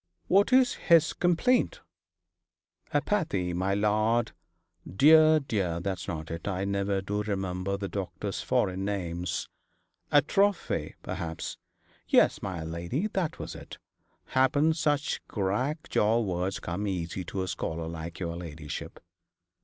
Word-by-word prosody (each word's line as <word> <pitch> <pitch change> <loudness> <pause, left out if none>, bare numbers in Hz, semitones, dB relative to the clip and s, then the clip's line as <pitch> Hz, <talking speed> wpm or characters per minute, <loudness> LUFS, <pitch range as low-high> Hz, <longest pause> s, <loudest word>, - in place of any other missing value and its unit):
'What 200 +6 +4
is 255 -1 +5 0.2
his 165 -2 +6
complaint?' 245 - +2 1.1
'Apathy, 125 - 0
my 95 +3 0
lady. 110 +3 +2 0.6
Dear, 155 +5 +7
dear, 95 - -1
that's 95 +1 -3
not 80 -1 -5
it. 85 +3 -5
I 95 -1 -1
never 100 0 0
do 105 +2 -1
remember 95 -2 -2
the 100 0 -4
doctor's 95 -1 -4
foreign 95 +1 0
names.' 90 -4 -2 0.6
'Atrophy,' 165 - +2
perhaps. 80 -1 -5 0.5
'Yes, - - +4
my 90 -4 -4
lady, 85 - -3
that 180 -6 -1
was - - -6
it. - - -10 0.5
Happen 145 +4 +3
such 150 -2 0
crack 120 - -1
jaw 110 +3 +2
words 95 -3 -1
come 95 +5 -3
easy 90 -1 -3
to 95 +2 -3
a - - -4
scholar 80 -2 -3
like 80 0 -6
your 85 -2 -3
ladyship.' 80 -3 -7
100 Hz, 125 wpm, -28 LUFS, 90-145 Hz, 1.1 s, Dear